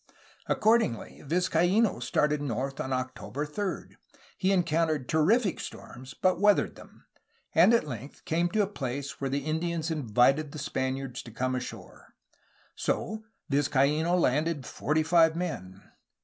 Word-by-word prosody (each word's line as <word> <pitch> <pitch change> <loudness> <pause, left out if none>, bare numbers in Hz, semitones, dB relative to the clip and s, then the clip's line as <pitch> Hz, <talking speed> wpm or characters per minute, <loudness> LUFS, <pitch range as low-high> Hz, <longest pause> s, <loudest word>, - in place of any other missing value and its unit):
Accordingly 220 - +1
Vizcaino 180 - +2
started 150 +4 +1
north 135 0 -3
on 130 - -3
October 130 +2 -3
3. 190 +6 -4 0.4
He 190 0 +1
encountered 165 -6 +1
terrific 185 +6 +2
storms, 130 0 -9
but 185 -1 +1
weathered 205 0 +4
them, - - -16 0.5
and 175 +7 +6
at 235 -9 +3
length 130 +1 -8
came 170 +2 +1
to 215 +3 +2
a - - -1
place 140 -5 -5
where 135 - -1
the 140 +1 -2
Indians 165 +1 -1
invited 135 +1 +2
the - - -6
Spaniards 130 -2 -3
to - - -11
come 130 +3 -1
ashore. 125 -1 -7 0.6
So 220 0 -2 0.2
Vizcaino 145 +4 +2
landed 150 -1 +1
forty 155 +2 0
five 160 0 +4
men. 95 - -5
150 Hz, 135 wpm, -28 LUFS, 135-175 Hz, 0.6 s, and